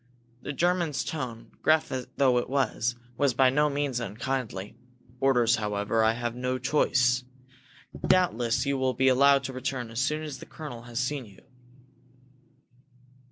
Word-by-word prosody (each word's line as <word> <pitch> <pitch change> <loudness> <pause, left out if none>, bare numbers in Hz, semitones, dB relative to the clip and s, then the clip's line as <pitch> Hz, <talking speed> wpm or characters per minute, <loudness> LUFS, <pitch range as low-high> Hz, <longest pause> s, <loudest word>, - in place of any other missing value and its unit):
The - - -5
German's 170 -1 0
tone, 125 -7 -5
gruff 155 0 +3 0.3
though 130 -3 +4
it 120 - -5
was, 130 -3 0 0.2
was 140 -4 +2
by 130 0 +5
no 150 +2 +3
means 140 -3 -1
unkindly. 115 -3 -4 0.4
"Orders, 120 -4 +3
however 105 +1 0
I 110 0 +4
have 120 0 -3
no 125 +1 -2
choice. 125 -1 +2 0.8
Doubtless 125 -8 +2
you 140 -1 0
will 130 -1 0
be 130 +2 +4
allowed 140 +1 +5
to 130 0 -5
return 130 -2 -4
as 115 - -4
soon 150 +3 0
as 145 -4 -6
the - - -11
colonel 145 -7 -8
has 120 0 -3
seen 135 0 -2
you." 100 - -18
130 Hz, 150 wpm, -27 LUFS, 120-140 Hz, 0.8 s, by